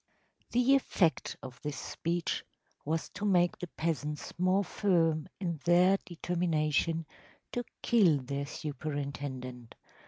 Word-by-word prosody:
‚ÄĚ - - -36
The 250 +3 +5
effect 175 -10 +1
of 130 -1 -9
this 150 -1 -4
speech 170 +1 -2 0.4
was 160 +2 -1
to 200 - -8
make 180 -4 +3
the 180 - -4
peasants 150 -3 -3
more 185 +2 +3
firm 165 -6 +2
in 170 -5 -2
their 180 +3 +5
determination 165 -2 0 0.5
to 245 - -2 0.2
kill 195 -11 +5
their 140 +2 -3
superintendent. 140 -5 -5
165 Hz, 120 wpm, -31 LUFS, 145-180 Hz, 0.5 s, The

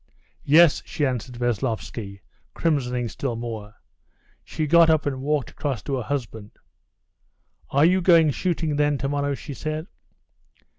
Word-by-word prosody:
"Yes," 155 +2 +6
she 150 - -2
answered 125 -1 -3
Veslovsky, 115 -4 -3 0.3
crimsoning 125 -7 0
still 120 +3 -4
more. 110 -2 -6 0.7
She 155 - -3
got 170 +2 +5
up 155 -2 +3
and 135 -2 -2
walked 145 -1 -1
across 140 -5 -4
to 135 -2 -2
her - - -2
husband. 115 -4 -5 1.2
"Are 140 +3 +4
you 185 +2 +3
going 165 -4 +5
shooting, 160 -2 -1
then, 145 -1 +2
tomorrow?" 140 +1 -1
she 145 - -8
said. 155 +4 -4
140 Hz, 135 wpm, -24 LUFS, 120-155 Hz, 1.2 s, Yes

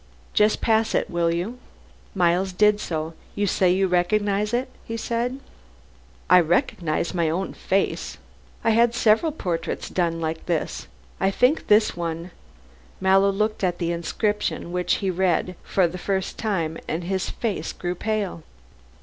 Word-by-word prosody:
"Just 210 0 +3
pass 225 -1 +2
it, - - 0
will 170 -1 +1
you." 185 +9 -3 0.6
Miles 180 +1 +2
did 210 +2 +4
so. 160 -3 -3 0.2
"You 205 - +1
say 185 -2 +2
you 190 +2 +3
recognize 200 +3 +1
it," 245 +2 0 0.2
he 230 - -5
said. 240 +3 -2 0.9
"I 180 - +7
recognize 170 0 0
my 170 -3 +1
own 185 +4 -2
face. 195 +1 -1 0.5
I 225 - +3
had 235 +1 +3
several 230 +8 +3
portraits 180 - -3
done 170 -2 0
like 160 0 -4
this. 170 -3 -2 0.3
I 195 - +3
think 250 +9 +2
this 210 +1 +4
one 170 +1 -4 0.3
" - - -27 0.3
Mallow 195 +1 +4
looked 215 +1 -1
at 175 -2 +1
the 170 -1 -1
inscription 175 +2 -2
which 180 0 +1
he 190 - +2
read 180 0 0
for 185 -3 +2
the 180 +2 -7
first 190 0 -2
time, 170 -8 -1
and 165 +2 -2
his 190 +1 -2
face 220 -5 -3
grew 175 0 -3
pale. 205 -2 -2
190 Hz, 155 wpm, -24 LUFS, 170-215 Hz, 0.9 s, I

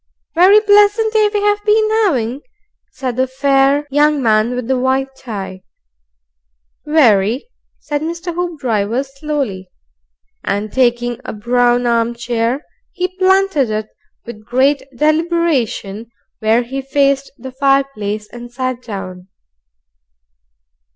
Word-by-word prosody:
"Very 375 +5 +6
pleasant 415 +1 +3
day 430 -1 +3
we've 415 0 0
been 430 +1 +3 0.2
'aving," 255 - -1 0.5
said 255 -3 -4
the 260 0 +1
fair 275 +2 +2
young 295 +1 +3
man 225 0 +2
with 250 -2 -4
the 260 -1 +1
white 265 +1 0
tie. 195 -7 -7 1.3
"Very," 240 - +3 0.3
said 290 -1 -4
Mr. 340 +2 -4
Hoopdriver, 260 - -1
slowly; 275 -9 -4 0.7
and 205 +2 -2
taking 240 -2 +1
a - - -6
brown 245 +2 +1
armchair, 235 +2 -1 0.3
he 365 -1 -3
planted 380 - +3
it 215 0 -3 0.4
with 215 -2 -10
great 265 +5 +2 0.2
deliberation 305 - 0 0.3
where 220 +3 +2
he 265 +3 -5
faced 275 0 +1
the 260 - -9
fireplace, 265 -6 0
and 240 0 -9
sat 255 0 -3
down. 185 -5 -7
260 Hz, 110 wpm, -16 LUFS, 230-305 Hz, 1.3 s, Very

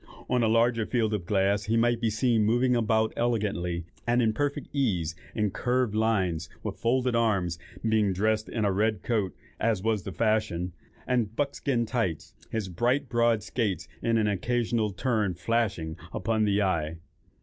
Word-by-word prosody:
On 125 - +2
a 115 - +3
larger 115 0 +2
field 110 -3 +1
of 90 -5 -3
glass 100 +1 +2
he 115 +1 +1
might 120 0 +2
be 115 - +2
seen 110 0 +2
moving 120 +3 +3
about 110 -1 +2
elegantly, 100 -8 -1 0.2
and 120 +1 +3
at 110 -3 +3
perfect 145 +4 -2
ease, 95 - 0 0.2
in 105 -3 +1
curve 125 -1 0
lines, 95 -7 +1
with - - -5
folded 125 +1 +1
arms, 95 -7 +1 0.3
being 110 -3 +3
dressed 110 +3 0
in 110 -3 -1
a 100 - +2
red 110 +3 0
coat, 105 -6 0 0.2
as 110 -5 +1
was 110 -2 +1
the 95 - -6
fashion, 105 -5 0 0.3
and 115 -4 0
buckskin 140 -3 0
tights, 110 -9 -2 0.2
his 110 -3 -2
bright 120 - 0
broad 115 -3 +2
skaites 110 -4 -2
in 115 0 +2
an 110 - +2
occasional 115 +2 0
turn 105 -3 0
flashing 90 -4 -1 0.2
upon 110 -1 0
the 100 0 +2
eye. 80 -4 0
110 Hz, 165 wpm, -28 LUFS, 100-120 Hz, 0.3 s, a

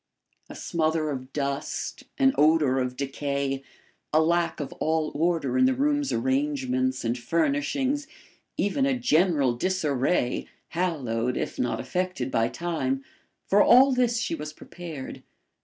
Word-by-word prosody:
A - - -9
smother 160 -2 0
of 130 -1 -6
dust 140 -1 -3
an 270 -1 +4
odour 150 -4 +4
of 125 0 -2
decay 140 0 -2 0.5
a 155 - +4
lack 170 +2 +1
of 145 -3 -5
all 160 -1 0
order 170 - +1
in 255 - +6
the 260 0 +3
room's 290 +1 +1
arrangements 265 - 0
and 115 +1 +1
furnishings 160 - 0 0.5
even 270 +7 +1
a 265 -2 +1
general 165 - +3
disarray, 145 -4 0 0.2
hallowed, 125 -9 -1
if - - -4
not 120 - 0
affected, 180 +2 -2
by 115 0 +2
time 135 -6 -2 0.4
for 205 +1 +4
all 260 +5 +7
this 245 -2 +2
she 225 - -1
was 150 -1 -5
prepared. 160 -5 -8
160 Hz, 135 wpm, -26 LUFS, -, 0.5 s, all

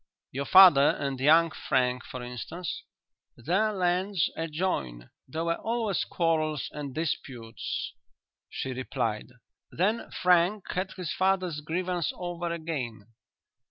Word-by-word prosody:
"Your 140 +2 -3
father 180 -7 +8
and 135 -2 -3
young 160 +4 +5
Frank, 125 -3 0
for 125 -1 -7
instance?" 125 +8 -5 0.6
"Their 190 - +1
lands 185 -1 +1
adjoin; 150 - -3 0.2
there 160 +5 -3
were 170 0 0
always 225 -3 -1
quarrels 155 -4 0
and 140 -3 -6
disputes," 125 -7 -4 0.6
she 130 - -4
replied. 125 -4 -2 0.4
"Then 210 +7 0
Frank 180 +3 +3
had 185 +2 -2
his 175 -4 -4
father's 185 -4 0
grievance 175 +2 -1
over 175 -1 -4
again." 135 -11 -5
165 Hz, 115 wpm, -28 LUFS, 135-180 Hz, 0.6 s, father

